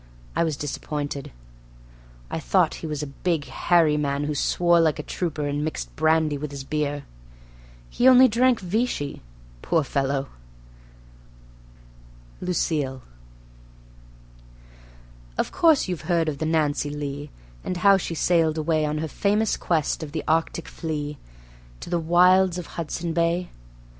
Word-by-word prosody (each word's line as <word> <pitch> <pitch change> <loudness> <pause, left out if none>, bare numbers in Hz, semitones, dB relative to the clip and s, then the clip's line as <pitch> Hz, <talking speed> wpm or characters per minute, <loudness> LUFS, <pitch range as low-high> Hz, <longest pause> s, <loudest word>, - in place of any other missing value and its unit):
I - - +2
was 160 -4 -1
disappointed. 145 -1 -4 1.0
I - - -2
thought - - +2
he 160 - -4
was 150 -1 -3
a 140 -2 -9
big, 165 -5 0
hairy 165 -4 +2
man 140 -1 -1
who 150 +1 -1
swore 170 +4 +2
like 160 -2 +2
a - - -5
trooper 155 -5 -3
and 145 +1 -2
mixed 155 - -4
brandy 155 -2 +2
with 150 +1 -4
his 140 -1 -7
beer. 145 0 -2 0.8
He 245 - +2
only 260 0 +8
drank 245 +1 +3
Vichy, 185 -6 -2 0.4
poor 165 -2 +1
fellow! 140 0 -1 2.1
Lucille 150 -7 -1 2.3
Of - - -1
course 320 -9 +4
you've 180 -5 -3
heard 170 -2 +2
of 145 -2 -3
the 160 - -1
Nancy 150 -2 +1
Lee, 145 0 -5 0.3
and 180 - -3
how 195 +2 +5
she 175 -2 -4
sailed 165 -1 +2
away 155 -1 +1
On 150 +1 -2
her 160 +1 -2
famous 210 +7 +1
quest 160 -3 -1
of 150 -2 -7
the 160 - -3
Arctic 165 +1 0
flea, 150 -3 -5 0.6
to - - -9
the 175 - +1
wilds 180 +2 +4
of 180 - -5
Hudson's 170 +1 -3
Bay? 170 +1 0
160 Hz, 140 wpm, -24 LUFS, 145-175 Hz, 2.3 s, only